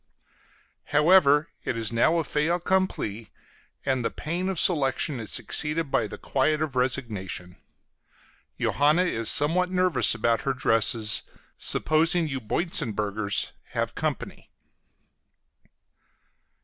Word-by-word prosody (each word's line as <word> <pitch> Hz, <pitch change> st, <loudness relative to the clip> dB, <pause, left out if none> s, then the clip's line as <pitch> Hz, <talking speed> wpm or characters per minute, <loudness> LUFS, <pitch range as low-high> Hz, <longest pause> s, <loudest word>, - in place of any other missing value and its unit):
However, 150 Hz, 0 st, +4 dB
it 115 Hz, -, -3 dB
is 115 Hz, -1 st, -2 dB
now 120 Hz, +9 st, +2 dB
a 165 Hz, -, 0 dB
fait 150 Hz, 0 st, -1 dB
accompli, 175 Hz, -, -1 dB, 0.6 s
and 130 Hz, -3 st, 0 dB
the -, -, 0 dB
pain 175 Hz, +5 st, -4 dB
of 190 Hz, -4 st, -2 dB
selection 140 Hz, -4 st, +1 dB
is 110 Hz, -, -5 dB
succeeded 150 Hz, +5 st, 0 dB
by 110 Hz, -, +1 dB
the -, -, -9 dB
quiet 150 Hz, +3 st, 0 dB
of 155 Hz, -4 st, -3 dB
resignation. 105 Hz, -9 st, -3 dB, 1.0 s
Johanna 150 Hz, +5 st, +2 dB
is 115 Hz, -11 st, 0 dB
somewhat 175 Hz, +5 st, +2 dB
nervous 185 Hz, -7 st, +3 dB
about 115 Hz, +1 st, 0 dB
her 135 Hz, -1 st, -2 dB
dresses, 115 Hz, -3 st, +2 dB, 0.3 s
supposing 165 Hz, +2 st, +2 dB
you 135 Hz, -3 st, -4 dB
Boitzenburgers 105 Hz, -, -1 dB, 0.2 s
have -, -, -1 dB
company. -, -, -5 dB
140 Hz, 110 wpm, -25 LUFS, 115-165 Hz, 1.0 s, However